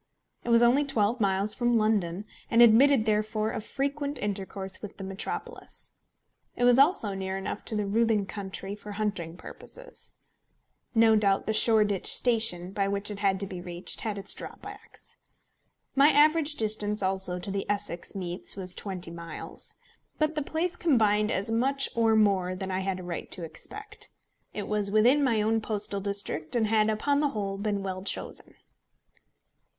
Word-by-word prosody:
It - - -5
was 235 0 +6
only 250 +5 +4
twelve 235 -4 0
miles 195 +1 +1
from 240 -1 +1
London, 205 -4 0 0.2
and 235 +1 +6
admitted 235 +1 +5
therefore 215 0 0
of - - -5
frequent 280 +3 -3
intercourse 195 -1 -4
with 210 -1 -9
the 195 - -7
metropolis. 195 +2 -5 0.6
It - - -2
was 245 +1 +5
also 275 - +3
near 190 0 -4
enough 195 +2 -5
to 220 - -3
the 210 -1 -1
Roothing 215 0 +1
country 195 -1 -6
for 210 0 -9
hunting 200 -6 -3
purposes. - - -11 0.8
No 225 -1 +5
doubt 200 -2 +2
the 220 - -1
Shoreditch 215 -3 +3
Station, 220 -7 +3
by 195 0 -1
which 200 +1 -2
it 200 - -7
had 195 -2 +1
to - - -2
be 185 -2 -7
reached, 175 0 -3
had 215 -3 -3
its 200 0 -5
drawbacks. 410 +2 -10 0.8
My 280 +2 +6
average 305 +1 +4
distance 210 -2 -1
also 190 -1 +1
to 180 +2 -5
the 195 0 -4
Essex 205 -4 -3
meets 180 -1 -2
was 185 -2 -3
twenty 180 -4 -5
miles. 170 -2 -7 0.4
But 310 0 +1
the 305 - -2
place 330 +4 -2
combined 215 -11 +2
as 200 0 -1
much 270 +4 +2
or 225 -1 +3
more 195 -4 +2
than 190 0 -5
I 185 - -1
had 190 -1 -2
a - - -8
right 175 -1 -5
to 180 - -2
expect. 420 - -8 0.4
It 205 - -5
was 210 -1 +2
within 240 +8 +4
my 230 -5 +2
own 225 +1 +1
postal 205 -2 -2
district, 200 -4 -2
and 230 -2 +2
had, 215 0 +2
upon 280 +7 +1
the 295 -1 +2
whole, 200 -5 -4
been 205 -1 -2
well 185 -1 -4
chosen. 195 - -4
210 Hz, 170 wpm, -27 LUFS, 195-235 Hz, 0.8 s, was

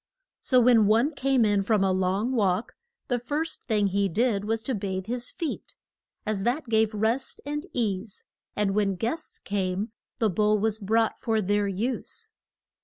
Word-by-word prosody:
So 255 - +3
when 235 -3 +5
one 235 +9 +3
came 270 -4 +2
in 205 -1 +2
from 205 0 +2
a 190 - +2
long 190 +5 0
walk 205 -4 +1 0.3
the 245 -3 0
first 295 +7 -3
thing 210 -3 +2
he 200 0 +1
did 210 +1 +1
was 225 +1 -1
to 260 - -1
bathe 190 -3 -3
his 240 +2 -2
feet, 330 -5 -5 0.5
as 215 -2 -1
that 250 +8 0
gave 220 -1 +2
rest 225 +5 0
and 295 +4 -4
ease, 210 -3 -2 0.3
and 205 -2 +1
when 200 -2 +1
guests 240 - -3
came 195 +1 -2 0.3
the 225 - +2
bowl 210 +3 +3
was 215 +1 0
brought 225 +2 +1
for 225 -2 0
their 205 0 +1
use. 250 - -3
220 Hz, 170 wpm, -26 LUFS, 200-245 Hz, 0.5 s, when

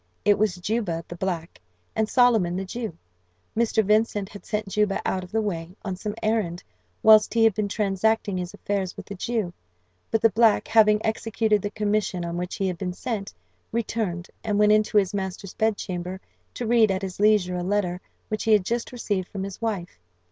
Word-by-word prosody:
It 205 -1 +4
was 210 -4 +2
Juba, 180 -3 -2
the 175 - -7
black, 170 - -4 0.3
and 220 -1 +1
Solomon, 225 -9 +4
the 190 +1 -2
Jew. 220 -3 -5 0.6
Mr. 220 -1 +2
Vincent 210 -1 +2
had 205 - -12
sent 210 -1 -2
Juba 210 0 +1
out 185 -1 -1
of 180 - -11
the 220 0 +1
way, 175 -3 -4
on 190 -2 -2
some 205 +3 -5
errand, 215 -6 0 0.4
whilst 215 0 +7
he 225 - +4
had 225 -2 +5
been 210 +1 -1
transacting 205 0 0
his 180 -1 -4
affairs 195 -2 -3
with - - -8
the - - -7
Jew; 205 -2 -2 0.6
but 225 - 0
the 225 - +6
black, 225 -1 +4
having 215 -1 +4
executed 220 -1 +1
the 205 - -2
commission 205 -4 -1
on 170 0 -4
which 180 +1 -3
he 195 - -1
had 180 -2 -3
been 180 -2 -3
sent, 205 0 -4 0.4
returned, 215 -6 -2 0.2
and 210 -2 0
went 210 0 +5
into 215 0 +3
his 195 -2 +3
master's 190 -1 -4
bedchamber, 190 -4 -2 0.4
to 245 - -3
read 225 -1 +4
at 190 0 -1
his 190 -1 -5
leisure 205 -3 +4
a - - -2
letter 180 -1 -1 0.3
which 215 - -3
he 220 - +5
had 205 -3 +4
just 235 +2 -2
received 205 -6 -2
from 195 -2 -5
his 195 +1 -7
wife. 195 - -3
205 Hz, 195 wpm, -25 LUFS, 185-220 Hz, 0.6 s, whilst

